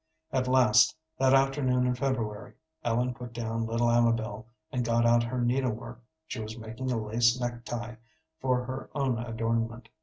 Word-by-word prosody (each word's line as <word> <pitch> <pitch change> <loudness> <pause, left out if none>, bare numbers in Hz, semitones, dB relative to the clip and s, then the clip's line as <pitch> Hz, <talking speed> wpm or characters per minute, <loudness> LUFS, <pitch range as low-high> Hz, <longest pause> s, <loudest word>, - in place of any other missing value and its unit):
At 130 -1 0
last, 125 +2 +5 0.2
that 135 0 +5
afternoon 135 -2 +2
in 125 - +2
February, 115 -5 -2 0.3
Ellen 120 +2 +1
put 120 -1 -9
down 115 -1 -2
little 115 +1 +1
Amabel 115 -1 +1 0.2
and 125 -1 -1
got 115 0 +2
out 120 0 +5
her 120 +2 -2
needle 125 0 +1
work. 120 +1 -9 0.2
She 130 - -6
was 110 +1 -6
making 115 +3 -5
a 120 - 0
lace 115 +3 +2
neck 120 -1 -4
tie 115 +1 -5 0.4
for 125 -1 +1
her 130 +1 -6
own 135 -5 0
adornment. 115 0 -2
120 Hz, 170 wpm, -29 LUFS, 115-125 Hz, 0.4 s, last